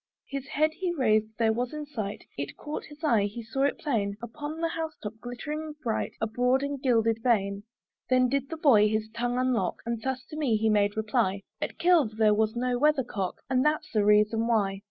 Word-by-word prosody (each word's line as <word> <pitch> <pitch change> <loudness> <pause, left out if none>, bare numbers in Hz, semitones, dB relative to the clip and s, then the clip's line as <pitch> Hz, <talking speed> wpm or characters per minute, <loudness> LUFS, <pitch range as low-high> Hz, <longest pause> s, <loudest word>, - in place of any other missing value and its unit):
His 275 -1 -5
head 310 +3 +2
he 365 +1 -2
raised 220 -9 +2
there 225 -1 +3
was 245 +3 -2
in 300 0 -5
sight, 220 -9 -5
It 140 0 -5
caught 300 +1 -5
his 300 +1 -14
eye, 230 -9 +3
he 215 +3 -5
saw 270 +5 0
it 285 - 0
plain 205 -9 -1
Upon 295 +7 -6
the 330 0 0
house 320 -1 -4
top, 210 0 -4
glittering 300 +6 -5
bright, 225 -4 -1
A - - +1
broad 250 +4 +1
and 280 -1 -3
gilded 230 -4 +2
vane. 200 -4 +1 0.5
Then 255 -1 +4
did 275 +1 -1
the 325 - -5
boy 225 -9 +5
his 215 0 -1
tongue 245 +1 -1
unlock, 250 -7 0
And 235 -1 -2
thus 260 +1 -3
to - - -6
me 275 -8 +1
he 220 +1 +1
made 205 0 +2
reply; 215 -3 0 0.2
"At - - -3
Kilve 320 -12 +3
there 215 -1 +5
was 220 +1 +1
no 245 0 0
weather 300 -1 +3
cock, 195 -6 -4
"And 255 0 +2
that's 300 0 0
the 215 -3 +2
reason 210 +2 +3
why." 200 -4 +1
240 Hz, 215 wpm, -28 LUFS, 215-280 Hz, 0.5 s, boy